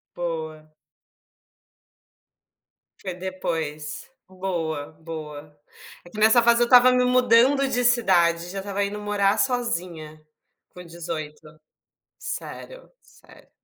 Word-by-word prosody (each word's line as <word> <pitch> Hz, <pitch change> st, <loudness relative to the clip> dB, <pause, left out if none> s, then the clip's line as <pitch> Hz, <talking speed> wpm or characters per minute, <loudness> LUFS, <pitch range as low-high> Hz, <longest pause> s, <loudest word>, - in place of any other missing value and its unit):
Boa. 160 Hz, -2 st, -5 dB, 2.3 s
Foi 185 Hz, -, -5 dB
depois, 160 Hz, -, -5 dB, 0.2 s
boa, 170 Hz, -6 st, -4 dB
boa. 150 Hz, -2 st, -8 dB, 0.5 s
É -, -, -13 dB
que 215 Hz, -, -9 dB
nessa 220 Hz, +3 st, +6 dB
fase 235 Hz, 0 st, +4 dB
eu -, -, +5 dB
estava 250 Hz, +1 st, +7 dB
me 250 Hz, 0 st, +3 dB
mudando 250 Hz, +2 st, +4 dB
de 245 Hz, -1 st, -1 dB
cidade, 175 Hz, -8 st, +2 dB
já 195 Hz, +2 st, -5 dB
estava 200 Hz, +1 st, -2 dB
indo 200 Hz, +1 st, -4 dB
morar 205 Hz, 0 st, +1 dB
sozinha, 175 Hz, -, -2 dB, 0.5 s
com 180 Hz, -, -11 dB
18, 165 Hz, -3 st, -7 dB, 0.8 s
sério, -, -, -8 dB
sério. -, -, -20 dB
185 Hz, 105 wpm, -24 LUFS, 160-235 Hz, 2.3 s, estava